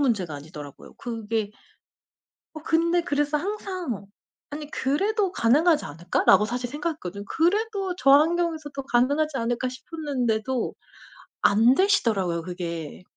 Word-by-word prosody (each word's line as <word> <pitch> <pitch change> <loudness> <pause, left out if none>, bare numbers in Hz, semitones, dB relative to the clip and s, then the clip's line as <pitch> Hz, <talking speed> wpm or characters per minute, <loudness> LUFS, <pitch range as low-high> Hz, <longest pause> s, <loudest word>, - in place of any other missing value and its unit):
문제가 205 - 0
아니더라고요. 145 -1 -10
그게 225 -2 -3 1.0
어 310 - -7
근데 335 +2 +2
그래서 290 0 0
항상 360 - -4 0.4
'아니 295 0 -7
그래도 390 +8 0
가능하지 300 +7 +3
않을까?'라고 175 +5 +3
사실 245 +1 -3
생각했거든요. 290 - -4
'그래도 390 - 0
저 275 - +3
환경에서도 310 -2 +2
가능하지 285 +5 +1
않을까?' 240 +2 -1
싶었는데도 255 -4 -2 0.7
안 225 +5 +5
되시더라고요 220 - +2
그게. 170 -2 -6
270 Hz, 325 characters per minute, -25 LUFS, 210-325 Hz, 1.0 s, 안